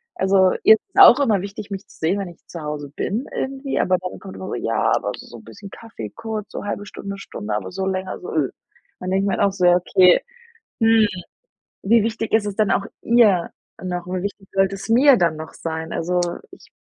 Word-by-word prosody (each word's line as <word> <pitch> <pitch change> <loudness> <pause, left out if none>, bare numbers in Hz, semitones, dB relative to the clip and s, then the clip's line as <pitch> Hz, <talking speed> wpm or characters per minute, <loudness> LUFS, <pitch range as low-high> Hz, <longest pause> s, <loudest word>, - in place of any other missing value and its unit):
Also, 190 -1 +3
ihr - - +9
ist - - -11
es - - +3
auch 290 -9 +9
immer 220 -9 +2
wichtig, 200 +1 -7
mich 195 0 -6
zu - - -19
sehen, 165 +5 +1
wenn 195 -2 -4
ich 170 - -15
zu 170 - -8
Hause 150 -2 -5
bin, 230 +7 -2
irgendwie, 270 +1 -3
aber 185 0 +2
dann 180 0 -6
kommt 195 - -10
immer 190 - -7
so: - - -3
„Ja, - - 0
aber - - -2
so - - -12
bisschen 200 - -12
Kaffee 225 +3 -9
kurz, 220 -2 -5
so - - -6
1/2 205 0 -4
Stunde, 200 -1 -7
Stunde.“, 105 - -5
aber 95 -3 -4
so 190 - -3
länger 190 0 -3
so, 180 - -8
üh. 145 -5 +1 0.5
Dann 185 0 -4
denke 190 +1 +1
ich - - 0
mir 195 - 0
halt - - +1
auch 200 - +3
so: 185 - -3
„Ja, 175 0 +6
okay, 180 0 +4 0.6
hm. 225 -1 +5 0.8
Wie 225 +3 +4
wichtig 225 0 -3
ist 220 -1 +3
es 200 - -4
dann 215 -2 +2
auch 200 - +1 0.2
ihr 215 -7 +4 0.3
noch, 180 -1 -4
wie 185 0 -3
wichtig 200 -1 -6
sollte 195 0 +2
es 195 - -9
mir 260 +4 +6
dann 170 -5 +1
noch 155 0 -8
sein?“ 160 0 -5
Also, 180 +2 -1 0.3
ich - - -16
195 Hz, 230 wpm, -21 LUFS, 180-215 Hz, 0.8 s, ihr